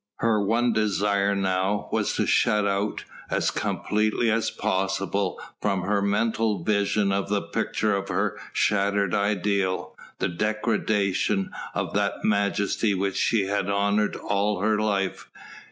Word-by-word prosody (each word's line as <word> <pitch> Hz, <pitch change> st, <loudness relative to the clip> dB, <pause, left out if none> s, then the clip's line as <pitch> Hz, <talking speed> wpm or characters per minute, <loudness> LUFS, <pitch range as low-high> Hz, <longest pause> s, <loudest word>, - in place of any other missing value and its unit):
Her 110 Hz, -3 st, +2 dB
one 115 Hz, +3 st, +2 dB
desire 100 Hz, -1 st, +1 dB
now 95 Hz, +1 st, 0 dB
was -, -, 0 dB
to -, -, +1 dB
shut 105 Hz, -1 st, +2 dB
out, 100 Hz, +1 st, -1 dB, 0.3 s
as -, -, +1 dB
completely 110 Hz, +2 st, 0 dB
as 115 Hz, +1 st, +1 dB
possible 95 Hz, 0 st, -1 dB, 0.2 s
from 100 Hz, -3 st, 0 dB
her 100 Hz, +1 st, +1 dB
mental 105 Hz, -1 st, 0 dB
vision 100 Hz, 0 st, +1 dB
the 100 Hz, +1 st, -1 dB
picture 105 Hz, -2 st, 0 dB
of 100 Hz, 0 st, -3 dB
her -, -, -1 dB
shattered 100 Hz, -2 st, +1 dB
ideal, 100 Hz, -2 st, 0 dB, 0.2 s
the -, -, 0 dB
degradation 105 Hz, 0 st, 0 dB, 0.2 s
of -, -, -2 dB
that -, -, -1 dB
majesty 100 Hz, 0 st, +1 dB
which 95 Hz, 0 st, -1 dB
she 110 Hz, -4 st, +2 dB
had 100 Hz, 0 st, -1 dB
honoured 100 Hz, +1 st, +1 dB
all 100 Hz, 0 st, -1 dB
her 105 Hz, +1 st, +2 dB
life. 100 Hz, -3 st, -1 dB
100 Hz, 130 wpm, -25 LUFS, 100-105 Hz, 0.3 s, Her